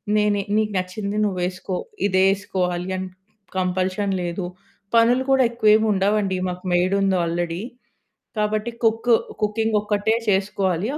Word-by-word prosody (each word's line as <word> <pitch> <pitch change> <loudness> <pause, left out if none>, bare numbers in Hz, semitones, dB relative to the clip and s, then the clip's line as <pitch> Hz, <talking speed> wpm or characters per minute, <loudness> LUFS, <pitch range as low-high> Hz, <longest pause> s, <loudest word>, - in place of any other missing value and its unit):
నేనే 210 -1 +2 0.2
"నీకు 215 -1 +1
నచ్చింది 200 +3 -3
నువ్వేసుకో," 185 0 -2 0.3
ఇదే 190 -1 +3
ఏసుకోవాలి 180 -2 -2
అన్ 185 0 -4 0.5
కంపల్షన్ 185 +2 0
లేదు. 175 +1 -3 0.5
పనులు 240 +3 +4
కూడా 265 -1 +5
ఎక్కువేముండవండి. 210 -3 +2
మాకు 180 +1 -6
మెయిడుంది 190 +1 +2
ఆల్రెడీ, 170 +1 -2 0.8
కాబట్టి 215 +2 0
కుక్కు 225 +1 +4 0.3
కుకింగ్ 220 +1 +1
ఒక్కటే 210 +1 +1
చేసుకోవాలి. 195 -1 0
200 Hz, 110 wpm, -22 LUFS, 185-215 Hz, 0.8 s, కూడా